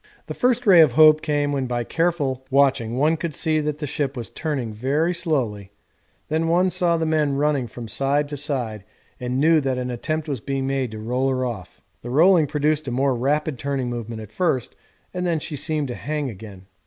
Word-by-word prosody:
The - - -6
first 245 0 +1
ray 185 -5 +8
of 150 -6 +4
hope 155 +2 +7
came 145 -1 0
when 135 -2 -1
by 120 -1 -1
careful 145 -4 -1
watching 130 -4 +2
one 155 +4 +2
could 165 -1 -4
see 155 -2 +1
that 150 -1 -2
the 150 - -4
ship 140 -1 -3
was 115 -5 -5
turning 135 -8 -3
very 145 +10 0
slowly, 115 - -2 0.5
then 160 +1 0
one 180 +3 +2
saw 175 -2 +2
the 160 - -1
men 155 -3 +1
running 140 -3 +1
from 115 +1 -9
side 140 +5 0
to 145 - -4
side 125 -8 -3 0.4
and 125 +1 -2
knew 160 +1 +4
that 135 -2 -1
an 125 0 -3
attempt 155 +6 -3
was 140 -4 -3
being 135 +1 -2
made 135 -2 -1
to 110 - -8
roll 125 +5 -1
her 130 -1 0
off. 105 -8 -7 0.2
The 120 - -7
rolling 160 +4 +5
produced 150 +1 0
a - - -2
more 135 +2 +1
rapid 145 +2 -1
turning 135 -3 -2
movement 115 -2 -5
at 105 - -13
first 130 -5 -1 0.4
and 180 -1 -2
then 170 -2 +1
she 150 0 -5
seemed 150 0 -1
to - - -3
hang 150 -2 -3
again. 100 -2 -11
140 Hz, 210 wpm, -22 LUFS, 125-155 Hz, 0.5 s, ray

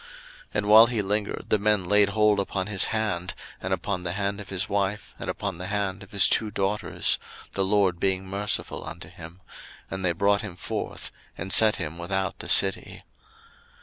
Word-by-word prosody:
01:019:016 475 - -17 0.5
And 105 - 0
while 110 +2 +9
he 115 -3 -1
lingered, 105 +1 -2
the 110 - +3
men 105 -1 +2
laid 100 +2 +4
hold 105 0 +3
upon 95 -1 -2
his 100 -2 +2
hand, 105 -5 -2 0.3
and - - -4
upon 100 -3 -2
the 85 -1 -3
hand 100 +1 -2
of 100 - -11
his 95 -1 -1
wife, 100 +1 -2
and - - -3
upon 100 -4 -4
the 90 - -5
hand 100 0 -2
of 100 - -12
his 100 -2 +5
two 110 - +1
daughters; 100 +1 0 0.3
the 95 - 0
LORD 95 -3 +2
being 95 0 0
merciful 100 +2 -1
unto - - -8
him: 85 +4 -12 0.5
and 95 0 -4
they 90 -2 +2
brought 100 +3 +2
him 100 -5 -7
forth, 90 - -4 0.3
and 95 +3 -2
set 110 -1 +8
him 85 -2 -5
without 95 +2 -2
the - - -6
city. 95 -1 +1
100 Hz, 190 wpm, -26 LUFS, 95-105 Hz, 0.5 s, while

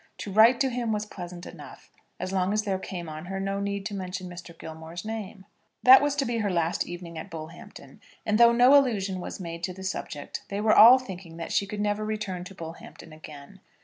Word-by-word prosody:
To 200 - -6
write 225 +5 +6
to 265 -1 +2
him 240 -2 -2
was 210 0 -1
pleasant 180 -3 -9
enough, - - -12 0.3
as 185 - -4
long 190 +1 0
as 215 0 +1
there 195 -3 -1
came 175 -3 -6
on 155 +1 -7
her 195 +1 -4
no 195 +1 -2
need 200 0 -3
to - - -4
mention 185 -1 -5
Mr. 175 -1 -10
Gilmore's 160 +3 -9
name. 215 -3 -6 0.4
That 260 +1 +9
was 290 -1 0
to 280 -2 0
be 235 -1 -1
her 210 -2 0
last 170 -1 0
evening 175 -2 -7
at - - -8
Bullhampton; 160 +1 -11 0.2
and 215 +1 +1
though 235 0 +8
no 245 +4 +6
allusion 205 -9 +2
was 180 - -7
made 170 -2 -7
to 185 - -6
the 190 +1 -10
subject, 150 -6 -5
they 200 - -3
were 215 +1 +3
all 235 +4 +9
thinking 185 -9 -9
that 165 - -6
she 200 - +1
could 205 0 -4
never 205 0 0
return 210 -4 -4
to 195 - -11
Bullhampton 165 -1 -10
again. 155 +4 -12
195 Hz, 220 wpm, -27 LUFS, 175-215 Hz, 0.4 s, That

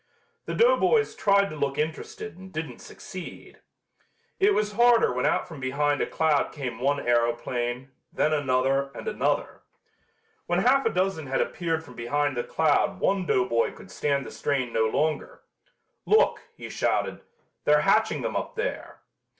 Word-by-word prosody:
The - - -4
doughboys 470 -2 +3
tried 200 -1 +2
to - - -6
look 140 -2 -2
interested 155 -1 -4
and 190 +1 -12
didn't 155 -1 -5
succeed. 185 -2 -10 0.8
It 400 +1 +4
was 210 0 0
harder 235 - +4
when 125 - 0
out - - 0
from 160 -4 -10
behind 145 +2 0
a - - 0
cloud 155 -3 +1
came 125 -5 -5
one 140 +3 +1
aeroplane, 120 +2 -1 0.2
then 155 - +1
another 135 -1 +1
and - - -8
another. 460 - -1 0.9
When 175 - +1
half 255 +8 +3
a - - +3
dozen 185 -5 -1
had 135 - -1
appeared 165 -2 -1
from 125 - -13
behind 145 +4 -1
the 120 - -1
cloud 175 +4 +1
one 190 -2 +1
doughboy 115 -2 +1
could - - -14
stand 140 -2 -1
the - - -8
strain 130 -4 -2
no 110 - +2
longer. 150 +7 -1 0.7
"Look," 435 +2 +4
he - - -8
shouted, - - -1 0.4
"they're 150 0 +5
hatching 195 - +2
them 115 - -3
up - - -3
there." - - -4
150 Hz, 160 wpm, -26 LUFS, 130-190 Hz, 0.9 s, they're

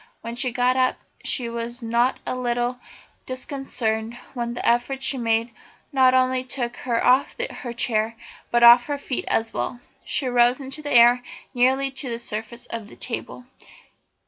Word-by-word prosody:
When 230 +1 -6
she 250 +1 0
got 250 +1 +2
up 255 -1 +2 0.3
she 245 -3 0
was 235 +1 -5
not 235 +3 +1
a - - -2
little 245 0 -1 0.5
disconcerted 240 -4 -3 0.2
when 240 -2 -3
the - - -2
effort 245 +3 +1
she 265 0 +2
made 230 0 +1 0.4
not 260 -1 +5
only 255 0 +2
took 245 -2 -3
her 235 -2 -1
off 255 +3 +3 0.2
her 245 - -6
chair 230 -1 0 0.3
but 240 0 +2
off 240 +1 +8
her 290 -1 -2
feet 275 -2 -3
as 225 0 0
well. 240 - -3 0.2
She 275 - -1
rose 245 0 +3
into 270 +2 -6
the 295 - -5
air 240 +1 +6 0.3
nearly 265 +2 +2
to 270 -1 -4
the 230 - -2
surface 230 +1 -5
of 230 -3 -6
the - - -14
table. 245 +1 -5
245 Hz, 170 wpm, -23 LUFS, 235-255 Hz, 0.5 s, off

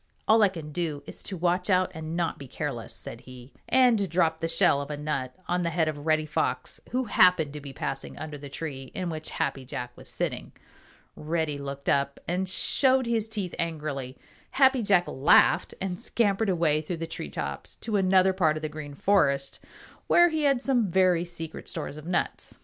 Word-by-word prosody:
"All 220 +1 +6
I 205 - +6
can 160 -5 -8
do 155 -3 -3
is - - -7
to 190 - -6
watch 180 +3 0
out 185 -1 +3
and 160 +1 -5
not 170 -2 -1
be 140 - -9
careless," - - -4
said - - -6
he, 130 0 -13 0.2
and 235 -7 +4
dropped 165 -2 +1
the 165 - 0
shell 165 -3 +3
of 140 - -7
a 150 - -4
nut 140 -4 -3
on 180 0 0
the 170 - 0
head 165 -1 +1
of 150 0 -4
Reddy 155 -1 +3
Fox, 150 - -2
who 255 +1 0
happened 180 - +4
to 150 - -7
be 140 -1 -8
passing 135 0 -5
under 155 -1 -6
the 140 0 -9
tree 135 -3 -6
in 180 -2 -2
which 155 -1 -4
Happy 135 -1 -2
Jack 125 -1 -6
was - - -11
sitting. - - -3 0.6
Reddy 155 -2 -2
looked 140 0 -7
up 140 0 +1
and 185 +2 -1
showed 260 +6 +3
his 225 -2 0
teeth 205 -5 -4
angrily. 150 -6 -3 0.3
Happy 265 -2 +4
Jack 195 -4 +4
laughed 135 +4 +4
and 185 -2 -3
scampered 210 -2 +1
away 165 -4 +2
through 165 +3 -4
the 165 - -3
tree 75 - -6
tops 70 0 -5
to 220 -2 -4
another 190 -1 +4
part 160 -5 +2
of 155 - -7
the 155 - -2
Green 150 -2 -8
Forest 140 -7 +2 0.5
where 345 0 +6
he 315 -2 0
had 275 -3 +2
some 245 -7 +2
very 180 -1 +3
secret 165 -2 -7
stores 145 - -5
of 155 +1 -10
nuts. 175 -1 -2
165 Hz, 200 wpm, -27 LUFS, 145-190 Hz, 0.6 s, All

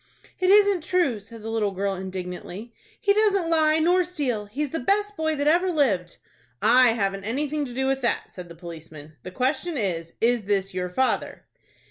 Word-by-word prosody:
"It 370 0 +2
isn't 405 -2 +5
true," 340 - +1
said 220 +2 -12
the 225 - -5
little 220 -2 0
girl, 195 +1 -2
indignantly. 190 +3 -7 0.3
"He 400 - +3
doesn't 400 -5 +2
lie 310 -1 +4
nor 355 +3 +3
steal. 275 - -3
He's 275 +6 -3
the 325 - -2
best 415 +8 0
boy 315 -2 -1
that 285 0 -2
ever 345 +5 +3
lived." 230 - 0 0.4
"I 250 -2 +5
haven't 195 -3 -2
anything 290 +7 -2
to 245 - -9
do 265 +1 0
with 270 0 0
that," 240 - -1
said 180 -2 -9
the 170 - -11
policeman. 160 -3 -10
"The - - -8
question 275 - -1
is, 170 -6 -3
is 235 -2 +2
this 195 -1 0
your 180 0 -3
father?" 260 +9 -1
245 Hz, 185 wpm, -24 LUFS, 195-320 Hz, 0.4 s, isn't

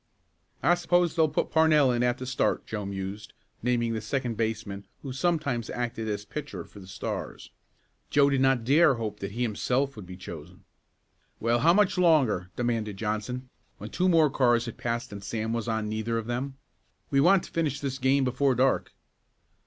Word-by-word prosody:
"I 175 - +5
suppose 175 -1 +2
they'll 160 -2 +3
put - - -1
Parnell 155 -4 +5
in 120 -1 0
at 125 0 +1
the 130 - -6
start," 130 0 0
Joe 105 -3 -4
mused, 100 +1 -6 0.3
naming 120 -1 +1
the 110 - -3
second 125 -1 -2
baseman 110 -3 -3 0.2
who 135 -3 -5
sometimes 140 -6 -1
acted 115 -2 -3
as 105 0 -3
pitcher 135 - -6
for 100 - -14
the 95 - -12
Stars. 95 - -6 0.6
Joe 140 -1 +4
did 135 -2 +2
not 135 -3 +3
dare 145 +3 +5
hope 110 -3 -4
that 100 0 -5
he 120 +2 -1
himself 125 +5 0
would 105 -5 -10
be 90 0 -9
chosen. 85 0 -10 0.8
"Well, 115 +1 +2
how 165 +7 +5
much 200 -3 +3
longer?" 135 - +3
demanded 115 -4 -1
Johnson, 110 +4 -3 0.3
when - - -8
two 185 +1 +1
more 160 -4 +4
cars 120 -3 +3
had 115 - -7
passed 120 -1 -3
and 100 -1 -8
Sam 110 +2 -3
was 115 0 -2
on 110 -1 -1
neither 110 +2 -2
of 115 - -3
them. 130 +3 -3 0.5
"We 135 -1 +4
want 185 +4 +5
to - - -11
finish 150 -4 -1
this 135 -2 -3
game 135 +2 +3
before 130 +1 +1
dark." 130 +2 +1
120 Hz, 185 wpm, -27 LUFS, 110-140 Hz, 0.8 s, I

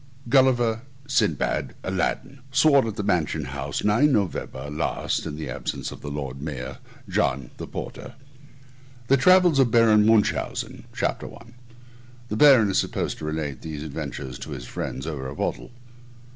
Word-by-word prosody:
GULLIVER. 120 -4 +3 0.2
x 135 - -7
SINBAD. - - +1
x - - -19
ALADDIN. 130 +8 -2
x 135 0 0
Sworn 140 -5 +5
at 110 - -4
the 105 - -3
Mansion 80 -6 0
House 70 +2 -4
9th 115 +8 +4
Nov. 75 - -2
last, 75 +1 -1
in 75 - -5
the 75 - -5
absence - - -4
of - - -10
the 70 - -6
Lord 70 -2 -5
Mayor. 70 -4 -6 0.3
JOHN 65 -1 0
(the - - -6
Porter). 120 - -7 1.0
TRAVELS 175 +2 +5
OF 130 -3 +5
BARON 110 -2 +5
MUNCHAUSEN 110 -2 +1
CHAPTER - - -2
I 115 0 -14 0.8
[THE - - -2
BARON 125 -6 +6
IS 95 - +2
SUPPOSED - - -2
TO - - -5
RELATE 75 -3 -3
THESE 75 -2 -6
ADVENTURES 65 -4 -6
TO - - -8
HIS 60 - -6
FRIENDS 65 +2 -5
OVER 70 -5 -4
A 70 - -7
BOTTLE. - - -3
100 Hz, 160 wpm, -24 LUFS, 75-120 Hz, 1.0 s, BARON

